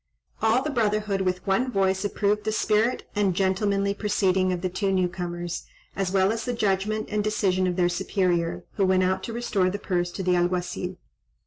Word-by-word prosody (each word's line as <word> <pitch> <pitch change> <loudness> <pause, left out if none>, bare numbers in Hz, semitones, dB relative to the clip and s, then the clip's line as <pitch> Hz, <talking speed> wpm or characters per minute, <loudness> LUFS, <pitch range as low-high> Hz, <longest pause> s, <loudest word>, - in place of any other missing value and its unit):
All 225 +4 +3
the 305 - -2
brotherhood 210 -5 0
with 185 -1 -1
one 245 +7 +1
voice 190 -2 +1
approved 205 +1 0
the 215 - -1
spirit 220 +2 +1
and 200 -3 +1
gentlemanly 200 +1 +1
proceeding 190 -3 +1
of 180 -1 -2
the 185 - 0
two 195 +2 -1
new 185 -1 +2
comers, 175 -1 -5 0.3
as 195 -2 -1
well 190 +1 +3
as 225 0 -2
the 245 - -2
judgment 215 0 0
and 210 0 0
decision 190 -3 +1
of 180 - -1
their 180 -1 +3
superior, 175 -1 0
who 195 - +3
went 185 0 +3
out 190 +1 +1
to - - -5
restore 215 -6 +1
the 195 - -3
purse 175 -3 -1
to 190 - -4
the 180 0 +2
Alguazil. 180 +1 -1
190 Hz, 195 wpm, -25 LUFS, 185-210 Hz, 0.3 s, All